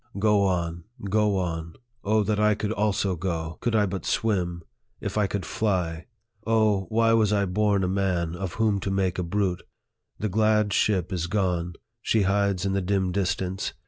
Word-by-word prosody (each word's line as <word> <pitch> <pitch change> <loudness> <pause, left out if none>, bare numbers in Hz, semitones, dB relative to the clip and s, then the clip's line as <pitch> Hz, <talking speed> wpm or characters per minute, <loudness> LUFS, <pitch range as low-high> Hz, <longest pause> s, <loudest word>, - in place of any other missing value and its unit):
Go 105 -1 +3
on, 85 -2 -1 0.3
go 105 -1 +2
on. 85 -2 -3 0.3
O 110 +1 +2
that 105 +1 0
I 105 0 +4
could 105 +1 -3
also 105 -3 0
go! 80 -2 -4
Could 120 -2 0
I 105 -1 +4
but 95 -1 -4
swim! 90 -6 -1 0.4
If - - -4
I 105 -2 +2
could 95 -3 -3
fly! 90 -6 -1 0.4
O, 110 -4 +2
why 115 +1 +3
was 110 -2 +3
I 100 -1 +2
born 100 +1 +1
a - - +1
man, 90 -3 0
of 90 -1 -5
whom 110 -3 +1
to 95 - -3
make 95 -2 0
a - - 0
brute! 90 0 -1 0.6
The 105 - -2
glad 105 0 +2
ship 95 -3 +1
is 85 -2 -1
gone; 90 -3 -1 0.3
she 110 -2 +2
hides 100 -1 +1
in 95 - 0
the 100 - +1
dim 95 0 0
distance. 95 0 -2
100 Hz, 180 wpm, -26 LUFS, 90-105 Hz, 0.6 s, I